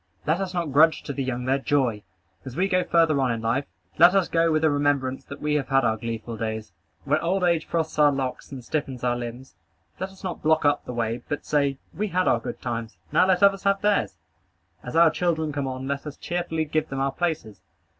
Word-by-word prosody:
Let 160 +4 +1
us 190 -2 -2
not 170 -5 -2
grudge 155 +3 +4
to 140 - -5
the 140 - -2
young 125 -1 -3
their 135 +2 +2
joy. 130 -6 +1 0.4
As 130 -2 -8
we 190 +2 +2
go 185 -2 +2
further 165 -5 +3
on 130 -2 +2
in 115 - -2
life, 120 +5 0 0.3
let 175 +3 +7
us 195 -3 +3
go 165 0 +2
with 155 0 +1
the 160 - +4
remembrance 145 -2 0
that 140 +1 -10
we 150 0 0
have 140 - -3
had 135 -2 +3
our 110 -1 +2
gleeful 115 0 -5
days. 110 0 -4 0.3
When 150 +2 +1
old 180 +4 0
age 170 -2 +2
frosts 160 -2 -2
our 145 -1 +6
locks, 135 -1 -4
and 130 -3 -8
stiffens 135 -4 -3
our 120 -1 +1
limbs, 120 +2 -7 0.5
let 190 - -3
us 190 +1 -17
not 185 -3 -4
block 155 0 +2
up 145 - +2
the - - -5
way, 115 0 -2
but 145 - -3
say, 140 -2 +1 0.2
"We 210 +2 -2
had 185 -1 0
our 120 - +3
good - - -7
times: 115 -2 -4
now 185 - +4
let 185 0 +3
others 195 -1 +5
have 200 0 +1
theirs." 210 -1 +1 0.6
As 125 - -7
our 165 -1 +6
children 160 -3 0
come 140 -2 -2
on, 130 0 -5
let 140 +2 -3
us 145 - -7
cheerfully 170 -2 -2
give 155 +1 -1
them 135 - -4
our 135 0 +1
places. 160 - -3
145 Hz, 235 wpm, -25 LUFS, 130-170 Hz, 0.6 s, let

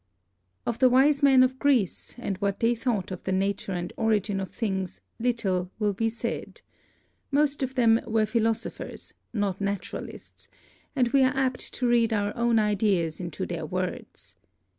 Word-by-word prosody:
Of 235 - -2
the 255 - +6
wise 275 +3 +4
men 270 -2 +6
of 260 0 0
Greece 255 - +1
and 205 -5 -3
what 200 -1 -1
they 230 +1 +3
thought 230 -6 -2
of 185 - -6
the 190 - -2
nature 195 +1 -1
and 175 -1 -4
origin 210 -3 +1
of 190 - -4
things 190 -5 -3 0.2
little 195 -7 0
will 210 -2 +1
be 225 +3 0
said. 235 - -5 0.7
Most 290 0 +1
of 265 0 -2
them 230 -2 +4
were 220 -1 +2
philosophers, 225 0 -2 0.2
not 205 -4 -1
naturalists, 200 -1 -5 0.5
and 250 -3 +2
we 275 +2 +4
are 260 +1 +2
apt 260 -2 0
to 250 - 0
read 235 -1 +3
our 205 -1 -1
own 235 -1 +2
ideas 200 -6 +1
into 175 -4 -4
their - - -4
words. - - -5
225 Hz, 160 wpm, -27 LUFS, 200-250 Hz, 0.7 s, the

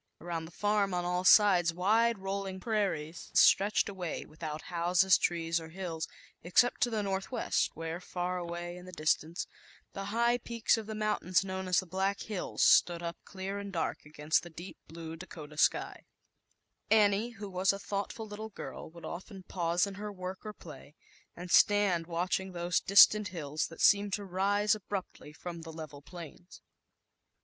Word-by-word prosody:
Around 170 -1 -4
the 165 - -11
farm, 205 0 +1
on 175 0 -1
all 180 +1 0
sides, 185 -4 +6
wide 225 +5 +3
rolling 195 0 -4
prairies 185 -7 -2
stretched 200 +2 +5
away, 185 -5 -5
without 155 0 -7
houses, 180 +2 +3
trees 170 -1 0
or 160 - -9
hills, 165 -2 -5 0.3
except 180 +9 +2
to 245 - +3
the 220 -3 -1
Northwest, 195 +5 -1
where, 165 +2 -5
far 180 0 -3
away 175 0 -5
in 180 - -11
the 185 - -10
distance, 155 0 0 0.5
the 195 - -5
high 235 +4 +2
peaks 235 -1 +1
of 220 -2 -6
the 220 - -5
mountains 210 -5 +1
10 195 - -7
known 190 0 -4
a - - -5
ZAUBER 180 -1 +1
LINJg 190 +1 -2 1.4
Ir 200 +1 -3
dark 190 -5 -3
against 150 +1 0
the 175 - -10
deep^lue 165 -1 -9
Dakota 155 -4 -10
sk 150 - +2 0.9
je, 210 +1 +4
who 205 0 -6
was 185 0 +2
a 195 - -4
thoughtful 200 +2 -4
little 215 +1 -7 0.4
would 170 +1 -12
often 190 +2 -8
pause 175 -1 0
in 200 - -6
her 210 0 -4
work 185 -1 -6
or 215 -1 -7 0.9
stand 185 -3 +4
watching 180 +2 -1
those 175 0 0
distant 210 +1 +6 0.5
seemed 200 -1 +4
to 205 0 -2
rise 200 +3 +2
abruptly 195 -7 -6
from 170 +3 -7
he 165 - -9
level 155 -3 -9
plains. 175 +2 -11
185 Hz, 150 wpm, -31 LUFS, 170-205 Hz, 1.4 s, sides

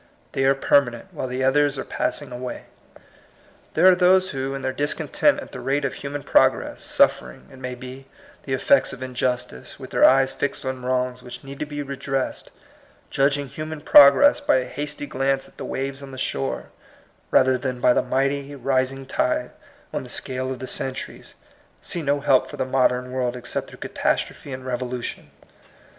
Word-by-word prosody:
They 135 - 0
are 135 +1 +4
permanent, 125 -3 +1
while - - -4
the 130 +1 -3
others 145 +1 +3
are 130 - -3
passing 145 -3 -3
away. 125 0 -6 1.1
There 165 - +4
are 185 - +9
those 185 +1 +4
who, 135 0 -3
in 135 - -6
their 130 0 -1
discontent 145 +2 +1
at - - -9
the - - -7
rate 140 +3 0
of 135 - -2
human 145 0 -6
progress, - - +2
suffering, 60 0 +1
it 135 - -13
may 130 -1 -5
be, 130 +2 -10 0.3
the 135 - -4
effects 280 - +3
of 130 - -7
injustice, 125 - -3
with - - -9
their - - +2
eyes 135 0 +5
fixed 140 -1 -3
on 130 -1 -4
wrongs 125 0 -1
which 120 -1 -10
need 135 0 -9
to 150 - -3
be 145 -1 -4
re 140 0 -6
dressed, 135 0 -3 0.6
judging 140 +1 +1
human 155 +3 -6
progress 145 - +7
by 285 - +2
a 130 - -1
hasty 150 +1 -5
glance 135 0 -1
at - - -22
the - - -6
waves 135 +1 -4
on 140 - -9
the 130 - -9
shore, 70 - -3 0.6
rather 130 0 +4
than 130 -1 -3
by 125 - +4
the - - +2
mighty 140 +1 -1
rising 135 0 -1
tide 125 -1 -1 0.4
on - - -1
the - - -11
scale 130 0 -3
of 130 - -4
the 130 - -6
centuries, 130 0 -5 0.4
see 170 - -4
no 145 -1 0
help 130 -1 +3
for - - -8
the - - -1
modern 125 -1 +1
world 125 -1 -1
except 125 -1 -5
through - - -13
catastrophe 140 - -2
and 130 0 -6
revo 125 -1 -3
lution. 125 -1 -5
135 Hz, 185 wpm, -23 LUFS, 130-140 Hz, 1.1 s, are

